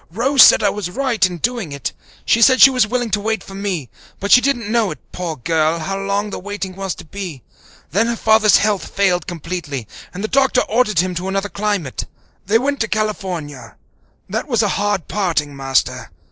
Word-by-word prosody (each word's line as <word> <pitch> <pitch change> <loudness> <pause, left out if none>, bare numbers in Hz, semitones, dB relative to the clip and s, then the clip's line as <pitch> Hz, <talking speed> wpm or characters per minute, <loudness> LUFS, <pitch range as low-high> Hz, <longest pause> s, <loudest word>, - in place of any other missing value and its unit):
Rose 255 - +3
said - - +8
I 200 - +3
was 205 -4 -4
right 255 +2 -1
in 180 -1 -7
doing 230 -3 -2
it. 140 -1 -4 0.3
She 230 - +3
said 260 +2 +6
she 275 - +9
was 250 -4 +2
willing 245 0 -2
to 210 - +1
wait 220 -2 -2
for 195 - -12
me, 195 -8 -3 0.3
but 200 +1 -3
she 250 - +8
didn't 240 -6 -1
know, 230 -4 +1 0.2
poor 175 -3 -4
girl, 160 +4 0
how 195 +4 -4
long 200 +1 -2
the - - -5
waiting 195 -1 -6
was 195 -1 -4
to - - -12
be. 170 - -7 0.5
Then 215 +8 +2
her 235 - -1
father's 220 -2 +4
health 210 -2 0
failed 180 -3 +1
completely, 165 - -5 0.2
and 190 +3 -7
the - - 0
doctor 270 +3 +3
ordered 215 -6 +1
him 185 0 -3
to 175 +2 -4
another 195 +1 -2
climate. 195 -6 -2 0.4
They 215 +3 +4
went 280 +3 -1
to 230 - 0
California. 180 - -4 0.5
That 220 +9 -3
was 235 -5 +1
a 205 - +1
hard 205 -3 -1
parting, 165 -8 -1
Master. 135 -1 -1
200 Hz, 200 wpm, -18 LUFS, 175-220 Hz, 0.5 s, she